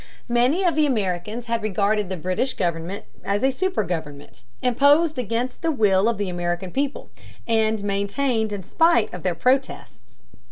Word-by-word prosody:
Many 250 +10 +2
of 350 -2 +3
the 305 0 +3
Americans 210 -1 -2
had 230 -1 -1
regarded 210 -1 0
the 185 - -3
British 185 - -1
government 170 +2 -3 0.2
as 200 +3 -1
a 265 - +4
super 375 - -1
government, 150 -5 -6 0.2
imposed 285 +4 +3
against 245 +2 -2
the 330 - 0
will 210 -5 +3
of 235 - -1
the 205 -1 -2
American 175 0 -3
people, 280 +4 -3 0.4
and 220 -2 +1
maintained 215 +3 0
in 200 -2 -4
spite 325 - +2
of 180 - -6
their 180 -1 -1
protests. 255 - -2
215 Hz, 160 wpm, -23 LUFS, 190-260 Hz, 0.4 s, a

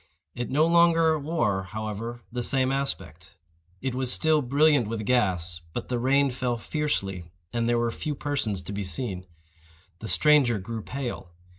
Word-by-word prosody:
It 120 0 -4
no 150 +4 +3
longer 165 -2 +4
wore, 145 - 0
however, 110 +4 -5
the 125 +1 -2
same 130 +1 +2
aspect. 95 - -4 0.5
It 130 -2 -1
was 130 0 -1
still 155 +1 +3
brilliant 140 -1 +3
with 110 -1 -4
gas; 90 -9 +1
but - - -4
the 125 -1 0
rain 135 +2 +3
fell 125 -1 -1
fiercely, 105 - -2 0.3
and 120 0 0
there 120 - +3
were 120 0 +1
few 150 +5 -4
persons 135 -10 -2
to 100 - -6
be 100 0 -3
seen. 95 0 -3 0.7
The 110 - -6
stranger 130 +3 +4
grew 110 +3 -5
pale. 125 -7 -5
120 Hz, 160 wpm, -26 LUFS, 105-140 Hz, 0.7 s, longer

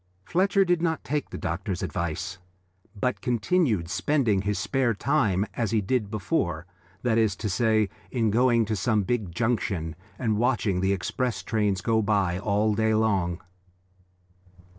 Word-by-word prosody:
Fletcher 195 +2 +2
did 175 -2 +1
not 160 -2 0
take 150 -1 -2
the - - -6
doctor's 90 +2 -3
advice, 90 +1 -3 0.6
but 125 +4 -1
continued 120 - +1
spending 105 - +1
his 100 0 -1
spare 120 +3 0
time 105 -7 +1
as 115 -3 -1
he 110 - +2
did 105 +1 -1
before, 95 - -1 0.4
that 115 -2 +2
is 110 -4 +2
to 105 - -4
say, 110 +2 +2 0.2
in 115 -4 +1
going 120 0 +3
to 110 +1 -1
some 105 +1 +1
big 110 -4 -1
junction 95 -6 -1 0.2
and 110 -4 0
watching 115 -6 +1
the 95 +1 +2
express 115 +6 -2
trains 105 -4 0
go 110 +2 +2
by 100 -4 +1
all 105 +1 +1
day 110 +1 +2
long. 95 -6 +1
110 Hz, 150 wpm, -26 LUFS, 95-120 Hz, 0.6 s, going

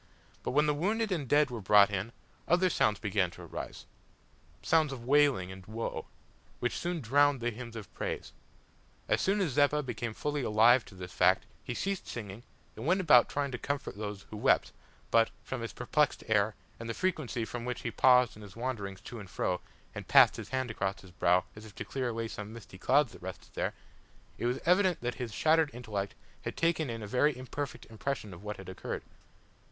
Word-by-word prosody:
But - - -3
when 150 +2 +4
the 150 - +2
wounded 210 +8 0
and 165 -6 -1
the - - -14
dead 145 -2 +4
were 115 -3 -5
brought 100 +1 +6
in, 100 +3 -2 0.4
other 180 +1 +3
sounds 105 -8 +2
began 100 -3 +1
to - - -10
arise - - -7 0.8
sounds 160 -3 +3
of 120 -3 -7
wailing 135 -9 +3
and 95 0 -10
woe, 115 +2 -4 0.5
which 120 - -1
soon 175 -2 -2
drowned 140 +3 +4
the 120 0 -1
hymns 115 0 -8
of 105 -4 -8
praise. - - -4 0.7
As - - +2
soon 200 +2 +2
as 175 -7 +1
Zeppa 145 +2 +3
became 120 -3 -4
fully 150 -1 -2
alive 115 +2 +5
to - - -14
this 90 -1 -8
fact - - +4 0.2
he 125 - -4
ceased 195 +5 -2
singing 105 -2 -6 0.3
and 115 +6 -6
went 185 +3 +4
about 150 -10 +6
trying 140 -1 -1
to 125 - -4
comfort 140 -6 -3
those 105 -2 -5
who 110 - -6
wept - - +3 0.4
but, 115 0 +5
from 130 -2 -4
his 115 - -4
perplexed 145 +4 +1
air, 105 0 +2 0.2
and 115 0 -6
the 115 - -2
frequency 155 -10 -1
with 110 - -5
which 125 0 -3
he 115 - -3
paused 125 0 +5
in 105 - -12
his 100 -3 -11
wanderings 110 -6 -4
to 120 -3 -8
and 100 -3 -10
fro 90 -1 -1 0.3
and - - -7
passed - - +7
his - - -7
hand 130 -2 -1
across 95 -2 -2
his 95 - -14
brow, 90 +1 +3
as 105 - -10
if 110 -3 -13
to - - -5
clear 130 -2 -2
away 115 0 -2
some 105 -1 -7
misty 105 -4 -11
clouds 135 +1 +3
that - - -13
rested 95 0 -8
there, - - -2 0.6
it 120 - 0
was 125 +2 0
evident 180 0 +4
that 120 0 -1
his 120 -3 -3
shattered 155 +6 +3
intellect 105 -5 -4 0.3
had - - -5
taken 165 -4 +1
in 115 -1 -4
a - - -5
very 130 +5 +2
imperfect 130 +2 -5
impression 110 -2 -4
of 85 - -11
what 105 -1 -5
had 95 - -10
occurred. 95 - -5
120 Hz, 210 wpm, -31 LUFS, 105-145 Hz, 0.8 s, passed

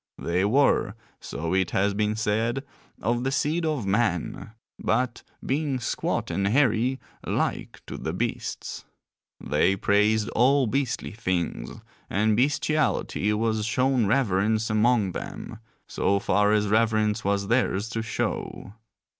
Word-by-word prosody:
They 90 +2 0
were, 115 -3 +2 0.2
so 80 +4 -4
it 95 -1 +2
has 100 +1 +1
been 105 +1 0
said, 110 +4 0 0.4
of 120 +2 0
the 135 - 0
seed 160 +4 0
of 150 -9 -1
man; 100 -3 0 0.3
but, 120 +2 0 0.2
being 140 -1 0
squat 120 - -2
and 100 0 0
hairy 125 +1 +2 0.2
like - - -2
to - - -7
the - - -3
beasts; - - -4 0.6
they 75 +6 +2
praised 105 +2 +2
all 135 +3 +3
beastly 130 +2 -1
things, 90 -6 -3 0.3
and 105 +2 +2
bestiality 140 -4 +1
was 110 0 0
shown 125 0 +1
reverence 110 -1 +1
among 110 -2 +3
them, 110 +5 -7 0.3
so 100 - +1
far 105 +1 +2
as 105 -1 +2
reverence 110 0 +2
was 100 0 0
theirs 115 -3 +1
to 115 -2 -2
show. 110 -2 -4
110 Hz, 130 wpm, -26 LUFS, 100-125 Hz, 0.6 s, all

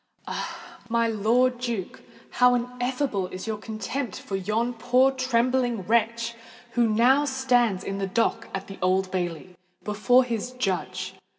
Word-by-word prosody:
Ah! - - -6
my 230 0 +2
Lord 235 +4 +2
Duke—how 245 +2 0
ineffable 245 -4 -1
is 185 0 -7
your 220 -1 -2
contempt 220 +2 -4
for 195 - -5
yon 215 +6 -1
poor 250 +3 +3
trembling 250 -3 +1
wretch 230 +2 +1 0.4
who 235 -1 +2
now 245 +6 +4
stands 245 -8 +1
in 195 0 -4
the 195 - -1
dock 230 +4 0
at 195 0 -4
the 195 - -10
Old 185 +1 +1
Bailey, 180 -1 -3 0.3
before 215 +5 +4
his 240 0 -3
judge! 185 -5 -2
230 Hz, 135 wpm, -26 LUFS, 195-250 Hz, 0.4 s, now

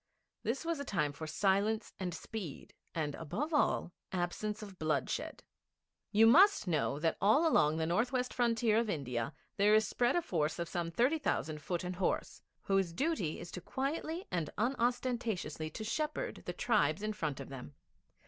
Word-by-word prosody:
This 255 +7 -2
was 335 -2 -1
a - - -2
time 160 - 0
for 155 +2 -7
silence 200 +6 +1
and 185 -2 -2
speed, 175 -1 -7 0.2
and, 150 -3 -1
above 280 - -3
all, 290 - +2 0.2
absence 205 +4 -2
of 195 -3 -10
bloodshed. 150 -4 -1 0.7
You 220 +2 +6
must 340 - +6
know 155 -4 +1
that 160 +2 0
all 245 +12 +5
along 155 - +4
the 160 - 0
north 195 +9 +1
west 250 -1 -1
frontier 230 -2 +3
of 230 -2 -1
India 125 - -2 0.3
there 210 +2 +5
is 215 -1 +4
spread 245 +3 +1
a 350 - +2
force 155 - 0
of 170 -1 -2
some 170 -1 -2
thirty 250 - +2
thousand 155 - -1
foot 175 +3 -2
and 180 0 -4
horse, 190 - -1 0.2
whose 195 -3 +1
duty 270 - 0
it 175 +1 -8
is - - -4
quietly 315 +6 -3
and 170 -5 -1
unostentatiously 235 - -1
to 220 - -6
shepherd 300 +8 -2
the - - -2
tribes 205 - +1
in 215 0 -1
front 155 -9 -3
of 135 - -7
them. 135 +1 -9
200 Hz, 175 wpm, -34 LUFS, 160-240 Hz, 0.7 s, You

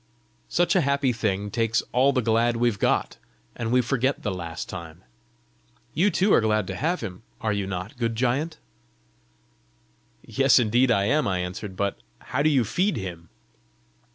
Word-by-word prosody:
"Such 175 +4 +2
a 185 - +5
happy 140 -3 +1
thing 105 -3 -2
takes 115 -1 +1
all 130 +3 +4
the 125 -3 0
glad 115 +1 +2
we've 115 -4 +1
got, - - +1 0.4
and 115 -1 -3
we 125 0 +4
forget 130 +2 0
the 105 - -1
last 85 -3 -6
time. 85 -3 -9 0.9
You 190 +6 +3
too 195 +2 +2
are - - +5
glad 110 -2 +1
to 95 +1 -5
have 165 - -1
him 90 +1 -6 0.2
are 110 -2 0
you 100 -2 -2
not, 95 +3 -5
good 115 -2 -1
giant?" 135 +7 0 1.7
"Yes, 135 0 +4
indeed, 120 +2 +3
I 100 -4 +3
am!" 150 +5 +2
I 95 -2 0
answered. 90 +2 -5
"But 100 -4 -2 0.2
how 130 - -3
do 155 - +4
you 135 -5 +3
feed 180 - 0
him?" 85 -3 -7
115 Hz, 170 wpm, -25 LUFS, 100-135 Hz, 1.7 s, a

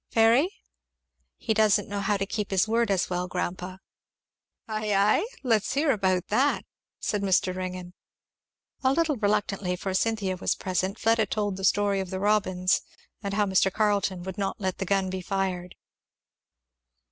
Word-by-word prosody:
Fairy?" 230 +9 +4 0.9
"He 220 - -1
doesn't 210 -2 +3
know 205 0 -3
how 200 +1 +1
to 195 - -1
keep 210 0 -3
his 195 +2 +2
word 230 +1 +1
as 190 -2 +1
well, 180 0 -2
grandpa." 180 +1 -4 0.9
"Ay, 215 -2 -1
ay? 205 - +3 0.2
let's 225 -5 +1
hear 290 +1 +3
about 190 -5 0
that," 265 +7 +2 0.3
said 210 - -1
Mr. 185 -1 +2
Ringgan. 185 -1 -5 0.9
A 260 0 +4
little 310 -2 +1
reluctantly, 205 -3 0
for 190 +1 -4
Cynthia 195 -2 0
was - - 0
present, 185 +1 -2
Fleda 225 -1 +2
told 205 -1 -1
the 190 - -7
story 200 +1 +2
of 190 -1 -4
the 190 - -4
robins, 190 -3 +2 0.4
and 200 -2 -3
how 210 0 +3
Mr. 190 0 +2
Carleton 200 -3 0
would 190 +1 -6
not 195 -1 -2
let 190 -2 -2
the 195 - -2
gun 190 -1 +1
be 190 0 -3
fired. 180 -1 -2
195 Hz, 160 wpm, -27 LUFS, 185-215 Hz, 0.9 s, Fairy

